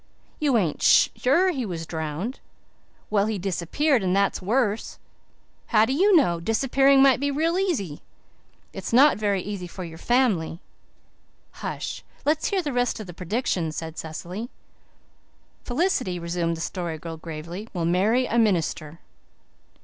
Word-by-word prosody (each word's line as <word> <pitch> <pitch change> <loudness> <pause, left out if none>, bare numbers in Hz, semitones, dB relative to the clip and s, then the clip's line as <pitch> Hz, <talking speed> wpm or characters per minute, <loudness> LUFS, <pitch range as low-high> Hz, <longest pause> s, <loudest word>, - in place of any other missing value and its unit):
"You 280 -5 +2
ain't 175 -8 -1
sure 345 +9 +4
he 270 -7 -3
was 170 -6 -5
drowned." 160 - -4 0.7
"Well, 205 -1 +2
he 220 -1 -1
disappeared, 200 - 0
and 185 0 +1
that 200 0 +2
is - - -6
worse." 215 +1 0 0.7
"How 215 -2 +4
do 260 - -1
you 385 +7 +4
know? 175 - +3
Disappearing 270 +7 +3
might 270 -2 +5
be 285 +1 0
real 325 +5 0
easy." 245 - -2 0.7
"It's - - -6
not 275 +4 +6
very 200 -3 0
easy 195 -3 -5
for 185 +2 -8
your 165 -1 -9
family." 215 -10 +1 0.9
"Hush, - - -5 0.2
let's 300 +1 +1
hear 390 -3 0
the 290 -3 -3
rest 245 -1 0
of 215 - -6
the 175 - -9
predictions," 180 -3 -2
said 160 0 -5
Cecily. 175 +9 -6 1.2
"Felicity," 255 - 0
resumed 170 -1 -2
the - - -6
Story 170 -2 -4
Girl 165 +1 -7
gravely, 170 +6 -7
"will 175 -3 -2
marry 205 +9 +2
a 235 -1 +1
minister." 170 -7 0
205 Hz, 150 wpm, -25 LUFS, 170-265 Hz, 1.2 s, not